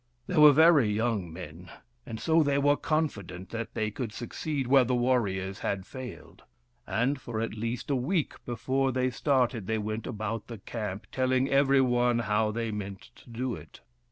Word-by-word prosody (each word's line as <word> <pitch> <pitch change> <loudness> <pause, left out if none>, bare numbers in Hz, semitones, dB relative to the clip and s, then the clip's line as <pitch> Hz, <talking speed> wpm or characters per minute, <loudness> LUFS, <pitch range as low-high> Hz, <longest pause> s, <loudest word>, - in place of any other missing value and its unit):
They - - -4
were 150 -1 +9
very 155 -5 +6
young 105 -5 -1
men, 85 +1 -9 0.4
and 110 - -6
so 165 +4 +3
they 140 -2 +2
were 145 +1 +4
confident 100 - -2
that 115 -1 -5
they 110 -1 -1
could 115 0 -4
succeed 135 +5 -4
where 135 +1 +5
the 125 +1 0
warriors 100 -7 0
had 95 -2 -2
failed; 125 -12 -9 0.5
and 130 +4 0
for 115 -2 -4
at 115 -1 -2
least 115 +5 -3
a - - +3
week 150 +6 0
before 130 +3 0
they 130 0 0
started 125 -6 +1
they 110 - 0
went 110 +1 -4
about 110 0 -4
the 115 - -7
camp 105 -1 -5
telling 130 +1 +1
every 135 0 +4
one 120 -1 +2
how 110 -1 +1
they 115 +1 -2
meant 100 -2 -7
to - - -17
do 120 +2 -3
it. 75 -5 -11
120 Hz, 180 wpm, -28 LUFS, 105-130 Hz, 0.5 s, were